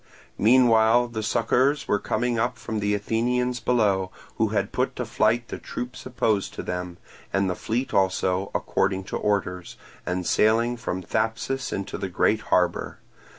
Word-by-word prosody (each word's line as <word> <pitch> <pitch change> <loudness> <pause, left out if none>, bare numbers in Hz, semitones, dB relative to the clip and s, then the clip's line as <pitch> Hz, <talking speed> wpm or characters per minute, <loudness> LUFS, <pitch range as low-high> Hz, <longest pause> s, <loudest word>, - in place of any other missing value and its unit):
Meanwhile 120 0 +5
succours 125 +6 +1
were 105 - +2
coming 120 +2 -1
up 120 +1 0
from 110 -2 -4
the 105 0 +1
Athenians 125 +4 0
below, 100 -6 +1 0.3
who - - +2
had - - -1
put - - -1
to - - -3
flight 115 +2 +1
the - - -5
troops 125 +1 -6
opposed 115 -5 0
to - - -5
them; 90 -1 -4 0.3
and 100 0 +1
the 90 - 0
fleet 120 +8 -3
also, 95 0 +1
according 95 -1 0
to - - -6
orders, 90 -4 -2 0.3
was 90 0 -2
sailing 115 +3 +3
from 95 -5 -4
Thapsus 115 +6 -2
into 100 - -4
the 95 - -3
great 105 +4 +2
harbour. 90 -2 +1
110 Hz, 150 wpm, -25 LUFS, 95-120 Hz, 0.3 s, Meanwhile